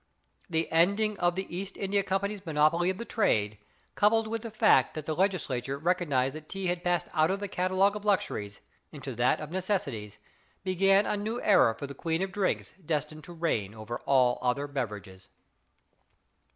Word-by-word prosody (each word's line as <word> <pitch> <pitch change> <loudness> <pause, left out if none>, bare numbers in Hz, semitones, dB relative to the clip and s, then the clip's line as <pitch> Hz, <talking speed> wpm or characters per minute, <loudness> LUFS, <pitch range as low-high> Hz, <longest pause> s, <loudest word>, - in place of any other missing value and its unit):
The 160 -1 0
ending 200 +6 +3
of 175 -1 +2
the 190 +1 -3
East 195 +1 -5
India 200 +1 +1
Company's 200 +1 -2
monopoly 160 +2 +2
of 190 - -2
the 235 - -6
trade, 105 - +1 0.3
coupled 220 +2 +3
with 225 0 -3
the 230 - -6
fact 220 0 +3
that 155 -1 -5
the 155 - -1
legislature 145 -8 -1
recognized 150 -6 +1
that 155 0 -10
tea 195 -1 -4
had 175 0 -1
passed 175 -1 0
out 155 -1 +3
of 195 +1 -1
the 205 - -4
catalogue 185 +2 +1
of 210 - -6
luxuries 105 - -1 0.3
into 140 -3 -7
that 120 +2 +2
of 155 0 -7
necessities, 145 - -2 0.5
began 195 +2 +3
a - - 0
new 215 +4 -3
era 115 - +5
for 140 - -6
the 140 - -7
queen 165 +5 -1
of 190 - -3
drinks 195 -1 -1
destined 155 0 -3
to 175 - -10
reign 115 - -1
over 110 +2 -6
all 130 -3 +4
other 125 +3 0
beverages. 105 -9 -6
175 Hz, 180 wpm, -29 LUFS, 135-195 Hz, 0.5 s, era